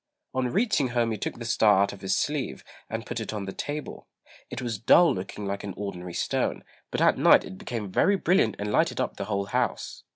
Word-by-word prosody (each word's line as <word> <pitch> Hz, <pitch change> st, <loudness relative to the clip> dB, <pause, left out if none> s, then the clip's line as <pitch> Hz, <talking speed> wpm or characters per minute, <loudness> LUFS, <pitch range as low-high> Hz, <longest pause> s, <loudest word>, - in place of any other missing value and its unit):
On 130 Hz, -1 st, 0 dB
reaching 190 Hz, -, +1 dB
home 120 Hz, -1 st, 0 dB
he 110 Hz, -, -2 dB
took -, -, -4 dB
the 120 Hz, -, -7 dB
star 105 Hz, -3 st, +4 dB
out 100 Hz, -, -2 dB
of 100 Hz, -, -12 dB
his 95 Hz, 0 st, 0 dB
sleeve, 140 Hz, -, -2 dB, 0.3 s
and 110 Hz, +1 st, -4 dB
put 120 Hz, -, -4 dB
it 110 Hz, -, -4 dB
on 105 Hz, -2 st, -4 dB
the 95 Hz, -, -6 dB
table. 150 Hz, +1 st, -6 dB, 0.4 s
It -, -, -5 dB
was 115 Hz, -4 st, -3 dB
dull 165 Hz, +10 st, +6 dB
looking 95 Hz, +2 st, -6 dB
like 100 Hz, 0 st, -3 dB
an 100 Hz, -3 st, -6 dB
ordinary 90 Hz, -3 st, -6 dB
stone; -, -, -1 dB, 0.3 s
but -, -, -2 dB
at -, -, +4 dB
night -, -, +6 dB
it 95 Hz, -, -9 dB
became 110 Hz, -5 st, -5 dB
very 200 Hz, -, +3 dB
brilliant 180 Hz, -, +2 dB
and 105 Hz, 0 st, -3 dB
lighted -, -, +1 dB
up -, -, -2 dB
the 100 Hz, -, -3 dB
whole 100 Hz, -1 st, -1 dB
house. -, -, -2 dB
110 Hz, 225 wpm, -27 LUFS, 100-125 Hz, 0.4 s, dull